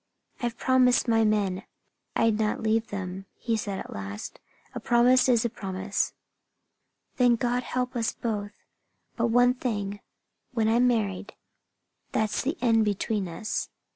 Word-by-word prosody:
"I've 240 -1 -2
promised 255 -1 +3
my 225 -1 +4
men 205 -3 +1 0.5
I'd 225 -1 +2
not 215 0 0
leave 225 +1 +1
them," 190 -1 -5
he 230 -2 -1
said 205 -3 -3
at - - -7
last. 100 +1 -7 0.3
"A - - -4
promise 250 +2 +4
is 235 -2 +3
a - - +1
promise." 195 -1 -2 1.0
"Then 245 -3 +5
God 245 +1 0
help 250 0 -3
us 230 -2 0
both! 210 -3 -4 0.6
But 235 0 +1
one 245 +2 +4
thing 205 -5 -3 0.5
when 225 -3 +1
I'm 235 +3 +4
married, 210 -5 -1 0.8
that's 215 -1 0
the 295 +7 -2
end 225 -3 +4
between 205 -1 -1
us. 215 +6 -3
225 Hz, 140 wpm, -27 LUFS, 205-245 Hz, 1.0 s, Then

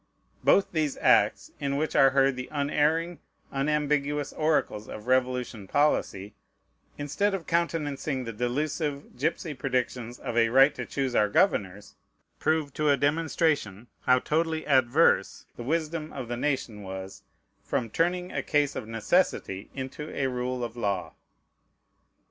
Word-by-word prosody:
Both 195 - +4
these 155 -4 -1
acts, - - +3
in 140 -1 -1
which 155 +2 -2
are 135 - +7
heard 135 0 +3
the 125 0 -6
unerring, 155 +3 0 0.3
unambiguous 145 0 0
oracles 155 -9 0
of 105 - -8
Revolution 125 -5 0
policy, 105 -8 0 0.6
instead 195 +8 0
of 180 - -6
countenancing 150 -5 -1
the 115 -1 -6
delusive 140 +5 -2
gypsy 155 +3 -2
predictions 125 -2 -2
of 115 - -5
a 115 -1 +4
"right 135 +4 +6
to - - -6
choose 135 -2 -2
our 105 -3 +3
governors," 105 - +1 0.5
prove 155 -3 0
to 150 -1 +1
a 140 - +4
demonstration 145 - 0
how 125 0 +4
totally 160 +3 -1
adverse 130 - +3
the - - -8
wisdom 155 +3 -2
of 130 -3 -5
the 120 - -2
nation 125 -5 -2
was 95 0 -7 0.4
from 115 -3 -2
turning 180 +4 0
a - - -2
case 145 -1 +1
of 110 - -5
necessity 115 - 0
into 135 +3 -6
a 135 - +1
rule 125 -1 -2
of 115 -1 -5
law. 100 -8 -2
140 Hz, 140 wpm, -27 LUFS, 120-155 Hz, 0.6 s, are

